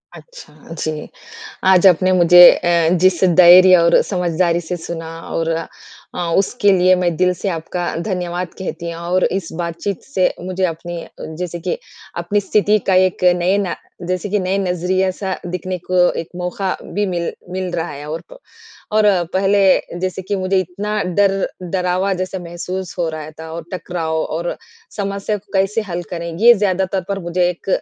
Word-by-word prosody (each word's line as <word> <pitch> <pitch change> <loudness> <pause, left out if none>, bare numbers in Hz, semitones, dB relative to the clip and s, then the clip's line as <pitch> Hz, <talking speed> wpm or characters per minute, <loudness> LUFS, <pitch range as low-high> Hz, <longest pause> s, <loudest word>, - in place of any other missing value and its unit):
अच्छा, - - -14 0.2
जी। 155 -1 -4 0.6
आज 190 0 +5
आपने 185 +1 +4
मुझे 175 -1 +6
अ, 170 -2 +1
जिस 185 0 +2
धैर्य 180 +1 +8
और 170 -1 +4
समझदारी 175 -2 0
से 175 +2 -5
सुना 165 -1 -6 0.2
और 165 0 -2 0.7
अ, - - -6 0.2
उसके 200 +1 +2
लिए 185 0 +4
मैं 175 -2 0
दिल 180 +1 +2
से 195 +3 -4
आपका 175 +1 -3
धन्यवाद 180 -2 -3
कहती। 170 -2 -5
और 175 +2 0
इस 190 -3 -1
बात-चीत 170 +3 -4
से 190 -9 +1
मुझे 185 +1 -3
अपनी 170 0 -4 0.3
जैसे 175 -1 -4
कि 180 +1 -2 0.4
अपनी 175 +4 0
स्थिति 210 +1 +2
का 190 - +3
एक 185 0 +2
नए 180 +3 +1
ना 195 -4 -2 0.3
जैसे 185 +2 -2
कि 210 - +1
नए 185 +1 -1
नज़रिया-सा 185 +1 -1
दिखने 180 +1 -4
को 180 -1 +3
एक 165 - -9
मौका 180 +2 -3
भी 205 0 -2
मिल 175 -2 -2 0.2
मिल 185 0 -3
रहा 170 0 -2
है। 145 +1 -8
और 160 - -4
क़ - - -10 0.6
और 215 0 +3
अ, 195 -4 +4
पहले 195 -2 +2
जैसे 185 0 -3
कि 200 +2 -2
मुझे 190 0 0
इतना 205 +4 -3 0.2
डर 200 -1 +4 0.3
डरावा 180 +2 -1
जैसा 185 +1 -3
महसूस 175 +1 -6
हो 170 - 0
रहा 155 -1 -7
था। 160 0 -8
और 165 0 -6
टकराव 175 -3 -3
और 170 +2 -3 0.4
समस्या 200 +1 -2
को 205 - -17
कैसे 195 +3 +1
हल 175 0 -3
करें, 170 -1 -4
ये 235 +3 +7
ज़्यादातर 190 -2 0
पर 200 0 -2
मुझे 175 +1 +1
एक 180 +2 -7
180 Hz, 170 wpm, -18 LUFS, 175-190 Hz, 0.7 s, धैर्य